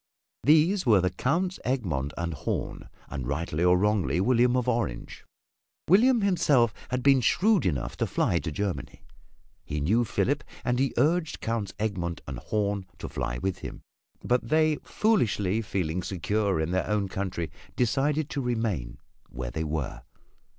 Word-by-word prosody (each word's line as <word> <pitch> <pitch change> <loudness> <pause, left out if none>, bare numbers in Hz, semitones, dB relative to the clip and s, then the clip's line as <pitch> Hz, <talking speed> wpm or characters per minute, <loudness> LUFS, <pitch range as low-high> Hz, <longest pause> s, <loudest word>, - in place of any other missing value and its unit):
These 160 +7 +4
were 105 -4 +6
the 90 0 +1
Counts 170 - -1
Egmont 85 - -1
and 85 -1 -2
Horn 70 -4 -4 0.2
and 65 -3 -5
rightly 75 +3 -1
or 90 0 +5
wrongly 95 -6 +1
William 125 +4 +3
of 125 -1 -1
Orange. 115 - -2 0.6
William 235 +7 +5
himself 145 - +3 0.2
had 125 0 -2
been 135 -2 +5
shrewd 200 - +3
enough 70 -8 -2
to - - 0
fly 85 - +1
to 80 - -4
Germany. 100 +4 -4 0.6
He 75 - -4
knew 105 +12 +2
Philip 140 +5 0 0.2
and 125 0 +1
he 135 0 +2
urged 160 +5 +1
Counts 110 -4 -3
Egmont 90 -6 -2
and 65 -3 -5
Horn 100 -3 -1
to - - -6
fly - - -3
with 95 +7 -2
him. - - -8 0.4
But 125 0 0
they, 155 0 +3
foolishly 115 - +1
feeling 90 -5 -2
secure 100 +1 -1
in 80 +2 -1
their 95 0 0
own 105 -2 0
country, 95 -3 -3 0.2
decided 135 +6 +1
to 140 - -2
remain 110 - -2 0.3
where - - -5
they 80 - -2
were. 75 -3 -3
105 Hz, 155 wpm, -27 LUFS, 85-130 Hz, 0.6 s, were